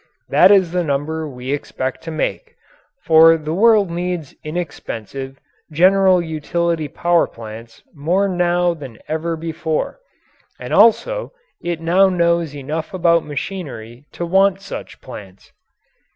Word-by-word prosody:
That - - +6
is 190 -4 +4
the 180 0 0
number 155 +1 -2
we 125 0 -6
expect 130 -2 -4
to - - -5
make 155 -1 -3 0.5
for 165 0 +6
the 155 0 -4
world 210 -1 +4
needs 175 -3 -3
inexpensive, 135 - -6 0.3
general 185 +3 +4
utility 160 0 -2
power 170 +4 +1
plants 115 0 -11
more 175 +6 +1
now 175 -1 +1
than 135 -8 -10
ever 160 +1 -2
before 160 - -3 0.6
and - - -6
also - - +3 0.3
it 170 -1 -3
now 185 +4 +4
knows 170 -4 +1
enough 155 +5 -5
about 170 -2 +3
machinery 140 - -7
to 175 - -4
want 190 +2 +3
such 195 - -9
plants. 100 -6 -12
165 Hz, 125 wpm, -19 LUFS, 145-180 Hz, 0.6 s, That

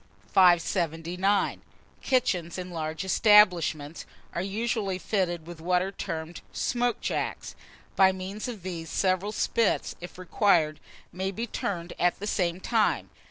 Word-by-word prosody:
579. 175 +1 +2 0.4
KITCHENS 195 -11 0
IN 180 0 -6
LARGE 160 +1 -4
ESTABLISHMENTS 180 -7 +4 0.3
are 170 - -2
usually 200 0 -1
fitted 175 -4 -1
with 170 -1 -10
what 180 +1 +2
are 190 - -4
termed 160 -3 -5
"smoke 245 -1 0
jacks." - - -3 0.4
By 190 -1 +6
means 190 +4 -5
of 220 -7 -7
these, 170 -3 -5
several 190 +2 0
spits, 225 0 0
if 175 - -9
required, 175 -4 +2 0.3
may 190 +2 -2
be 220 +4 -3
turned 175 -6 -4
at 175 0 +2
the 205 - -5
same 180 -4 0
time. 220 +2 +1
185 Hz, 130 wpm, -27 LUFS, 170-205 Hz, 0.4 s, By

